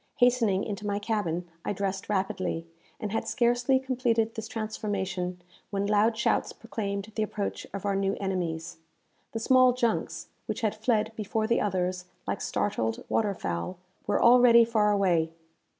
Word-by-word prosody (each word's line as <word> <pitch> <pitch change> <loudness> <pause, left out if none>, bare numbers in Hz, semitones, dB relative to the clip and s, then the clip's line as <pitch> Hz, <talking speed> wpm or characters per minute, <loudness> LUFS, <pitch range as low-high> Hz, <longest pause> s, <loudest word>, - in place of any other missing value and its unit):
Hastening 240 -6 +3
into 205 0 -4
my 200 0 0
cabin, 205 -5 -1 0.2
I - - -1
dressed 195 0 -3
rapidly, 190 -4 -1 0.3
and 210 - -3
had 225 - -1
scarcely 245 +2 +3
completed 240 -4 0
this 220 -1 -5
transformation 195 -5 -3 0.3
when 200 -1 -1
loud 210 +2 +3
shouts - - +1
proclaimed 200 -1 -4
the 220 - 0
approach 210 -1 -3
of 200 0 -6
our 200 -1 +1
new 195 0 +1
enemies. 175 -4 -3 0.6
The 225 - -2
small 255 +1 +5
junks, 235 -3 -1 0.2
which - - -3
had 215 -3 +1
fled 220 0 +1
before 215 +1 -1
the 235 +1 +2
others 180 -2 -1 0.2
like - - -2
startled 115 - -1
water 205 -3 +1
fowl, 85 - -3 0.3
were - - +2
already 235 -1 +7
far 220 -2 +2
away. 175 -5 +2
205 Hz, 150 wpm, -28 LUFS, 190-225 Hz, 0.6 s, already